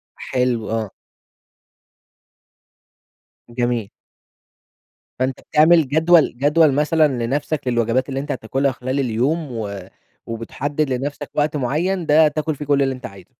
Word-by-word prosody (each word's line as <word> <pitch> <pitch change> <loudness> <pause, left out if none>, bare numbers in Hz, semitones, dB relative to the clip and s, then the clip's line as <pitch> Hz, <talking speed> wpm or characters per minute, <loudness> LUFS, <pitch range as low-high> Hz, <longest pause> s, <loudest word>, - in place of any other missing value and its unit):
حلو 125 -3 -1
آه. 110 -3 -2 2.6
جميل. 120 -3 -2 1.3
فأنتَ 130 0 -1
بتعمل 160 -1 +5
جدول 160 -2 +3
جدول 150 +2 +4
مثلًا 150 +2 +3 0.2
لنفسك 145 +2 -2
للوجبات 120 +2 +1
اللي 135 - -2
أنتَ 140 - -4
هتاكلها 135 +3 -1
خلال 130 +3 -3
اليوم 135 +5 -1
و 105 -4 -5 0.5
وبتحدد 140 +6 -3
لنفسك 135 +3 -4
وقت 150 0 0
معين 165 +8 -1
ده 155 +1 +5
تاكل 155 +1 -2
فيه 145 +1 -7
كل 140 -1 +2
اللي 135 -1 0
أنتَ 125 - -10
عايزه. 100 -2 -11
135 Hz, 120 wpm, -20 LUFS, 120-150 Hz, 2.6 s, بتعمل